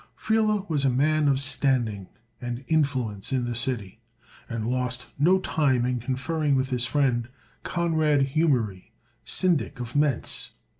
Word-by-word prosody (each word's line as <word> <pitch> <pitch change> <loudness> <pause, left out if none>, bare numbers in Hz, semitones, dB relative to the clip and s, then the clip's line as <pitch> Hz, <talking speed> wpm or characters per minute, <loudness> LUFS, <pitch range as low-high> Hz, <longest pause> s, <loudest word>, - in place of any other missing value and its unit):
Friele 215 -2 +1
was 150 -4 0
a 135 - +3
man 150 +4 +2
of 135 -1 +3
standing 130 -7 0 0.3
and 120 +1 -5
influence 130 -10 0
in 130 -2 0
the 120 - -2
city, 115 -4 -3 0.5
and 115 -2 -3
lost 125 0 -1
no 175 +6 +5
time 135 -9 +1
in 125 0 -1
conferring 140 +4 -1
with 130 0 0
his 125 -1 0
friend, 125 -3 +1 0.3
Conrad 155 -5 +1
Humery, 125 - 0 0.3
Syndic 170 -7 +1
of 120 -1 -6
Mentz. 145 -4 0
135 Hz, 140 wpm, -26 LUFS, 120-150 Hz, 0.5 s, no